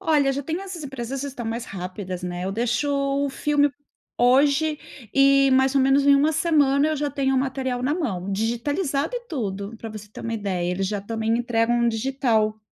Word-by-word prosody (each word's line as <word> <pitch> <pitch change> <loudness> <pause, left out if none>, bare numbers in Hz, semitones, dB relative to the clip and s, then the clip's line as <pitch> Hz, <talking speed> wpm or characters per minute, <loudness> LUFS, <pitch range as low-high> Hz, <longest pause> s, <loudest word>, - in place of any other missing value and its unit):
Olha, 290 -4 +2
já 280 +1 -3
tenho 325 +6 -3
essas 370 -5 -7
empresas 265 0 -5
estão 260 -4 -6
mais 230 +1 -3
rápidas, 185 -1 -6
né, 180 0 -4
eu 195 - -2
deixo 240 +6 0
o 280 0 0
filme 290 +1 +1 0.5
hoje 285 +5 +3 0.4
e 275 0 +5
mais 265 +1 +3
ou 275 - +4
menos 270 +1 +3
em 280 - +7
1 295 +3 +3
semana, 295 -3 +3
eu 310 - -1
já 290 0 -1
tenho 270 -1 0
o - - +4
material 260 -2 -2
na 285 +4 +1
mão, 200 - -3
digitalizado 275 - -1
e - - -2
tudo, 205 - -4
pra 225 - -7
você 210 -1 -9
ter - - -10
uma 230 - -3
ideia, 185 -4 -2
eles 190 +1 -1
já 205 -1 -2
também 225 +2 -1
entregam 235 0 +1
digital. 225 -3 0
265 Hz, 195 wpm, -23 LUFS, 225-280 Hz, 0.5 s, em